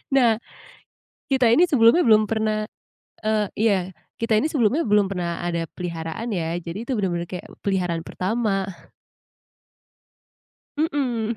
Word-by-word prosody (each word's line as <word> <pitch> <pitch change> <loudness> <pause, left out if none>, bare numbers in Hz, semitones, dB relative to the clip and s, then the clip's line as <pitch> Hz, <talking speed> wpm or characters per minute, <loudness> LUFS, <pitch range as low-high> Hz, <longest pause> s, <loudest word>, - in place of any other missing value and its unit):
Nah, 235 -5 +4 0.9
kita 265 -2 +3
ini 335 - +6
sebelumnya 245 +3 +5
belum 215 -1 +6
pernah, 215 -1 0 0.6
eee 215 -1 +2
iya, 215 -1 +3 0.4
kita 230 -1 0
ini 295 - +2
sebelumnya 270 +4 +2
belum 210 -2 +4
pernah 175 -3 -3
ada 170 -1 -1
peliharaan 170 +5 -5
ya, 165 -1 -2
jadi 170 +2 -6
itu - - -4
bener-bener 175 -4 -1
kayak 180 - -6 0.2
peliharaan 180 -4 -1
pertama. 220 +4 -1 2.3
Mhm. 255 -8 -1
215 Hz, 120 wpm, -23 LUFS, 180-235 Hz, 2.3 s, ini